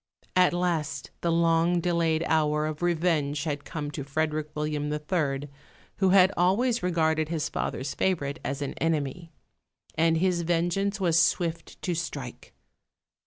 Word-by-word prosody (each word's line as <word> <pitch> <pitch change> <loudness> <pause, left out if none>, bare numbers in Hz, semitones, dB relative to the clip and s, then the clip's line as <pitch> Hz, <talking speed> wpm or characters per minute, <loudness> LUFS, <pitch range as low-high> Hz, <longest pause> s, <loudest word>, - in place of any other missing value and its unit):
At 180 -1 +5
last 165 -6 -2
the 170 - +1
long 165 +1 +3
delayed 165 -2 +1
hour 150 -1 +2
of 155 0 -4
revenge 160 -4 +1
had 145 -3 -3
come 145 -2 -5
to 145 - -5
Frederick 155 +2 -2
William 150 -1 -2
III., 150 -2 -1 0.5
who 190 -1 +3
had 190 0 +6
always 225 +7 +2
regarded 160 -3 +1
his 160 -2 -1
father's 135 +1 -3
favourite 160 -5 -1
as 140 +1 -3
an 140 - -4
enemy; 165 +1 -1 0.6
and 165 0 +2
his 180 0 +1
vengeance 175 +4 0
was 170 -3 +3
swift 165 0 0
to 180 - 0
strike. 150 -7 -6
165 Hz, 140 wpm, -27 LUFS, 150-175 Hz, 0.6 s, had